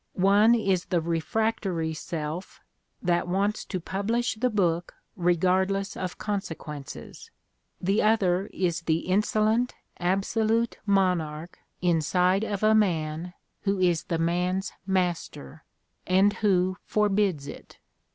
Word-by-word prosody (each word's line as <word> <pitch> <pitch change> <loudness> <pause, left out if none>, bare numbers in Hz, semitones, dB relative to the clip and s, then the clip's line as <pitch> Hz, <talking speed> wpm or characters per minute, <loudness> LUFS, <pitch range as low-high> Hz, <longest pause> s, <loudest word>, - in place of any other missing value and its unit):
One 205 +5 +5
is 195 -6 +1
the 175 - +1
refractory 170 0 -1
self 160 +2 -5 0.4
that 175 0 +1
wants 200 +4 0
to 185 - -3
publish 210 +7 -1
the 250 +3 0
book 175 -6 0 0.2
regardless 185 +2 +1
of 185 -1 -4
conse 200 -5 -3
quences; 150 -3 -9 0.5
the 195 +4 +1
other 195 -3 +2
is 175 -2 -1
the 165 -1 0
"insolent 215 +5 +1 0.2
absolute 220 +5 0
Monarch 175 -5 0 0.2
inside 180 +3 +2
of 205 -2 -3
a 215 0 +5
man 175 -4 0 0.3
who 200 -1 0
is 175 -4 +1
the 170 -4 -1
man's 180 +3 0
master" 175 - -2 0.4
and 190 +3 +4
who 185 -3 +1
forbids 200 -7 +1
it. 145 - -10
185 Hz, 115 wpm, -26 LUFS, 170-205 Hz, 0.5 s, One